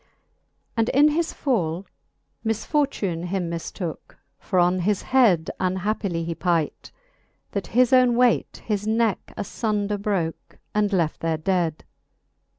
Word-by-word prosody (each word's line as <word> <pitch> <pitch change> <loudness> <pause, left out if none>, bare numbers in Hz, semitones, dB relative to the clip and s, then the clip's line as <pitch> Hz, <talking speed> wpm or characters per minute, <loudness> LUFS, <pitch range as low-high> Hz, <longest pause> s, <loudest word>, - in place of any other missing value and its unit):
VIII. - - -37 0.7
And 225 0 +2
in 285 +3 +5
his 325 +2 0
fall 185 - -1 0.6
misfortune 220 - -1
him 180 -2 -2
miflooke; 170 0 -6 0.2
For 185 - -2
on 180 +1 +4
his 195 +2 0
head 215 -11 +3
unhappily 185 -1 -1
he 165 0 -3
pight, 165 -3 -1 0.6
That 200 -2 -3
his 250 +2 +3
owne 250 -2 +5
waight 245 -1 +2
his 210 -1 -1
necke 220 -1 0
afundeir 205 -1 -2
broke, 185 -6 -2 0.2
And 210 -1 +1
left 170 -5 0
there 165 -1 0
dead. 165 -1 0
200 Hz, 130 wpm, -24 LUFS, 170-225 Hz, 0.7 s, in